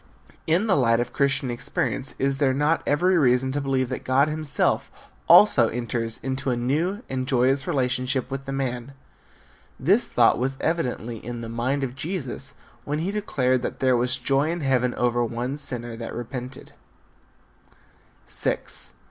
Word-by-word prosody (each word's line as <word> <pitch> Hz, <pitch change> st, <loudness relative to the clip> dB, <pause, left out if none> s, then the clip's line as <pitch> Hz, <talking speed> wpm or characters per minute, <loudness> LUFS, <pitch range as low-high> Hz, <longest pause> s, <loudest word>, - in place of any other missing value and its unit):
In 170 Hz, +7 st, +2 dB
the 205 Hz, -, +3 dB
light 115 Hz, -4 st, +3 dB
of 120 Hz, -, -3 dB
Christian 140 Hz, -2 st, +1 dB
experience 130 Hz, +2 st, -2 dB
is 135 Hz, 0 st, 0 dB
there 135 Hz, -3 st, +2 dB
not 150 Hz, +4 st, +2 dB
every 180 Hz, +5 st, +3 dB
reason 130 Hz, -1 st, +3 dB
to 145 Hz, +2 st, -2 dB
believe 135 Hz, -2 st, 0 dB
that 130 Hz, -, -4 dB
God 135 Hz, +3 st, +3 dB
himself 155 Hz, -1 st, 0 dB, 0.4 s
also -, -, +7 dB
enters 115 Hz, -1 st, -3 dB
into 135 Hz, 0 st, -2 dB
a 125 Hz, -, +1 dB
new 160 Hz, -, -1 dB
and 130 Hz, -1 st, -3 dB
joyous 130 Hz, +1 st, +2 dB
relationship 130 Hz, -3 st, 0 dB
with 135 Hz, 0 st, -4 dB
the 135 Hz, -, -5 dB
man? 130 Hz, -1 st, -3 dB, 0.9 s
This -, -, +3 dB
thought -, -, +4 dB
was 135 Hz, +2 st, -1 dB
evidently 125 Hz, -8 st, -2 dB
in 120 Hz, 0 st, -6 dB
the 115 Hz, -, -6 dB
mind 130 Hz, +5 st, -1 dB
of 125 Hz, -2 st, -3 dB
Jesus 150 Hz, -2 st, -5 dB, 0.3 s
when 145 Hz, +1 st, -2 dB
be 170 Hz, +5 st, -2 dB
declared 130 Hz, -12 st, 0 dB
that -, -, -4 dB
there 130 Hz, -1 st, +3 dB
was 125 Hz, +1 st, +1 dB
joy 135 Hz, +4 st, +1 dB
in 170 Hz, 0 st, -2 dB
heaven 125 Hz, -3 st, +1 dB
over 120 Hz, 0 st, +1 dB
one 120 Hz, +3 st, -3 dB
sinner 120 Hz, -5 st, -2 dB
that 115 Hz, 0 st, -7 dB
repented. 125 Hz, +2 st, -7 dB
130 Hz, 155 wpm, -24 LUFS, 125-140 Hz, 0.9 s, also